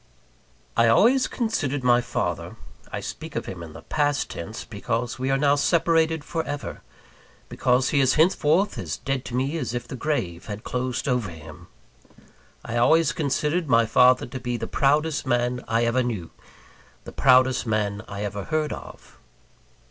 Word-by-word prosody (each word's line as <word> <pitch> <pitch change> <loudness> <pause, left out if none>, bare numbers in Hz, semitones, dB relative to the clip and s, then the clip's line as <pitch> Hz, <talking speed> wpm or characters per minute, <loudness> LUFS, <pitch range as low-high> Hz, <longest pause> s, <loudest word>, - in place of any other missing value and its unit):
I 115 - +4
always 240 - +4
considered 145 - -2
my 120 -1 +4
father 125 - -3 0.4
I - - -4
speak - - -7
of - - -2
him 90 - -7
in 80 -2 -9
the - - -11
past 145 -1 0
tense, 95 +7 -7
because 120 +3 -3
we 130 +1 -1
are 135 - +2
now 140 0 +3
separated 160 +1 +2
for 165 +1 -3
ever; 145 0 -6 0.7
because 125 +1 +1
he 145 - +2
is 130 -1 +3
henceforth 165 +3 +2
as - - -4
dead 135 -2 -3
to 125 - -5
me 135 +6 -1
as 125 - -3
if 120 0 -4
the 130 - -6
grave 120 - -3
had 105 +1 -6
closed 125 +1 -3
over 125 -6 0
him 80 -2 -12 1.0
I 120 - -3
always 160 +6 +4
considered 150 +3 -1
my 115 -1 +5
father 125 +3 +4
to 130 +2 -7
be 120 -1 -3
the 115 - -4
proudest 150 +3 +1
man 120 0 0
I 115 +1 +1
ever 115 +2 +2
knew; 110 -9 -3 0.7
the - - -9
proudest 130 -1 +4
man 105 -2 -1
I 100 0 -5
ever 100 -1 -4
heard 155 -1 -1
of. - - -12
130 Hz, 170 wpm, -24 LUFS, 115-150 Hz, 1.0 s, my